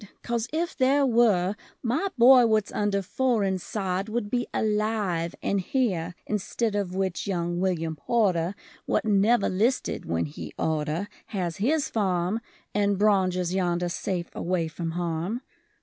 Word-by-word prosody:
Coz 235 -1 -1
if 335 +3 -1
there 275 +2 +3
were 215 -6 +3 0.3
My 255 +11 0
boy 245 0 +8
what's 215 -2 +1
under 200 -1 0
foreign 205 -3 +1
sod 190 +1 -3
Would 215 -2 -2
be 245 -1 0
alive, 210 -6 0
and 200 -1 +1
here: 180 -7 -1
Instead 215 +2 -1
of 190 -3 -2
which 190 -1 -1
young 175 -2 -1
William 165 -4 0
Porter 185 -1 +1 0.3
What - - +1
never 210 +2 +3
listed 225 +8 0
when 85 0 0
he 75 - -8
orter 160 +4 -1 0.2
Has 180 -5 -3
his 285 +8 +1
farm; 190 -1 0 0.3
And 200 -1 +2
braunges 185 -3 +2
yonder 175 -2 0
safe 175 0 -3
away 175 -2 -1
from 165 +1 -4
harm. 175 +6 -2
195 Hz, 140 wpm, -26 LUFS, 175-225 Hz, 0.3 s, boy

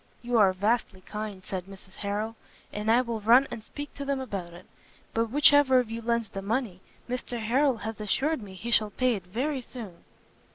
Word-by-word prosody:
"You 240 -1 +2
are 195 -3 +6
vastly 205 0 0
kind," 210 -1 -6
said 185 -2 -4
Mrs 195 -1 -12
Harrel, 210 +2 -2 0.4
"and 210 +1 -2
I 235 +2 +6
will 235 -3 -3
run 240 +6 +6
and 220 - -6
speak 290 +4 -8
to 280 - -6
them 280 -1 -1
about 195 -9 -5
it: 175 +2 -13 0.5
but 230 0 +1
which 290 +4 +6
ever 280 -3 +6
of 245 -3 +1
you 230 +1 -4
lends 235 -2 0
the 195 - -5
money, 210 -3 -2 0.3
Mr 245 -1 -4
Harrel 255 +4 +2
has 220 +1 -5
assured 270 +8 0
me 195 -2 -10
he 230 +6 -5
shall 215 -2 +4
pay 255 +4 +1
it 190 -5 -6
very 260 +8 -1
soon." 220 -8 -9
225 Hz, 205 wpm, -28 LUFS, 200-250 Hz, 0.5 s, are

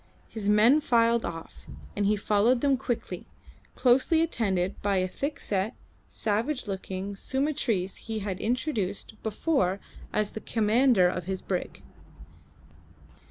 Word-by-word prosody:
His 210 -2 -3
men 225 +8 +6
filed 235 -4 +3
off, 165 -1 -8 0.3
and 205 -1 +1
he 210 - +3
followed 210 +4 +2
them 280 -2 +3
quickly, 245 -2 -4 0.5
closely 270 +6 +4
attended 195 - -1
by 200 -1 +1
a 185 0 +1
thick 280 +10 -4
set, 200 +3 -1 0.3
savage 225 +6 -1
looking 190 0 -4
Sumatrese 260 -6 -1
he 225 -1 -5
had 195 -3 -3
introduced 220 -4 -2
before 210 - 0 0.3
as 210 -1 0
the 220 - -7
commander 225 -2 +3
of 180 0 -3
his 190 0 -4
brig. 180 -2 -4
215 Hz, 125 wpm, -28 LUFS, 195-250 Hz, 0.5 s, men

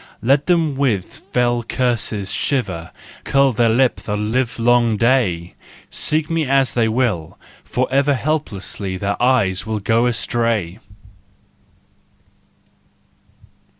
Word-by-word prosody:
Let 140 +4 +2
them 165 -5 +2
with 125 -9 -1
fell 120 -1 +1
curses 115 -5 -2
shiver, 95 -12 -2 0.3
Curl 135 -1 +3
their 115 +1 +2
lip 125 +3 +2
the 105 -1 -4
livelong 115 +1 +1
day! 105 -8 +1 0.4
Seek 155 0 0
me 165 -1 0
as 135 -1 +2
they 115 -2 +2
will, 110 -9 -1 0.3
forever 135 +3 +1
Helplessly 105 - -3
their 100 +3 -3
eyes 120 -7 +2
shall 110 +2 -3
go 115 +4 +1
astray! 115 -5 -1
120 Hz, 105 wpm, -19 LUFS, 105-130 Hz, 0.4 s, Curl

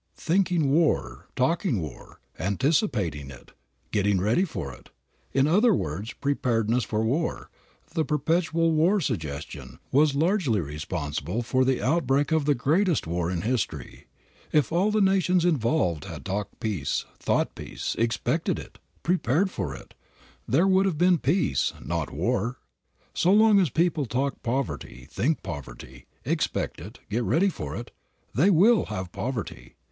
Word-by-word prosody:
Thinking 175 -4 +1
war, 160 +1 +1
talking 150 - +1
war, 75 -7 -9 0.2
anticipating 100 - 0
it, 65 -3 -13 0.4
getting 100 -2 +2
ready 110 - +2
for 95 - -5
it, - - -16 0.4
in 135 +1 +3
other 205 +8 +4
words, 95 - -4
preparedness 120 -4 0
for 110 0 -1
war, 150 +8 -2 0.4
the 160 -2 +1
perpetual 165 +2 +1
war 170 +6 +3
suggestion, 75 - -4
was 145 +1 +4
largely 160 - +2
responsible 75 - -3
for 130 +2 +2
the 130 -1 +1
outbreak 145 0 +1
of 160 -2 +2
the 145 -1 +3
greatest 160 +7 +1
war 85 +1 -1
in 90 -2 -2
history. 105 - -3 0.4
If 150 0 +2
all 180 +5 +2
the 215 0 +2
nations 185 -2 +3
involved 120 - +1
had - - -8
talked 100 +2 -4
peace, 95 -11 -2
thought - - 0
peace, - - -5
expected 115 -1 0
it, - - -10 0.2
prepared 175 +2 +1
for 80 -9 -4
it, - - -13 0.5
there 160 - +3
would 190 0 +4
have 175 -6 -1
been 175 0 +4
peace, 140 - +1
not 85 -3 -3
war. 120 +6 -1 0.6
So 180 - +2
long 215 0 +6
as 180 -5 +2
people 160 -2 +1
talk 135 +5 -2
poverty, 115 - -3
think 155 +5 0
poverty, 65 -6 -8 0.2
expect - - -1
it, 105 - -10
get 110 +4 -1
ready 180 +11 +3
for 75 - -6
it, - - -7 0.4
they 170 +11 +4
will 205 +5 +5
have 95 -2 -5
poverty. 110 - -5
130 Hz, 145 wpm, -26 LUFS, -, 0.6 s, long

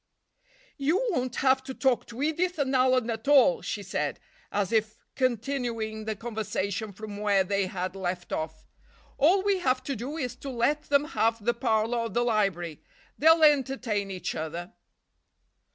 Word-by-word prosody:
"You 295 +6 +2
won't 255 -7 -1
have 265 0 +3
to 265 0 -7
talk 260 -3 +1
to 235 +4 -5
Edith 345 +4 0
and 275 -2 0
Alan 255 -2 +3
at 225 +3 -6
all," 290 - +5
she - - -4
said - - -2 0.3
as 200 -2 -1
if 220 -1 +1 0.2
continuing 235 -3 -2
the 220 0 -2
conversation 215 -2 -3
from 205 +1 -8
where 205 -2 +3
they 200 0 0
had 185 0 -4
left 180 -2 -4
off. 160 0 -4 0.5
"All 360 +7 +4
we 400 -2 +2
have 255 -5 +1
to 275 0 -3
do 265 +8 -5
is 250 -5 -3
to 275 - -7
let 270 +5 0
them 285 0 +3
have 230 -8 0
the 240 - +3
parlor 235 -1 +1
or 230 0 -2
the 240 +3 0
library. 195 -9 0 0.4
They'll 320 +2 +6
entertain 265 -8 +2
each 185 -2 -4
other." 165 +3 -5
235 Hz, 165 wpm, -27 LUFS, 205-275 Hz, 0.5 s, They'll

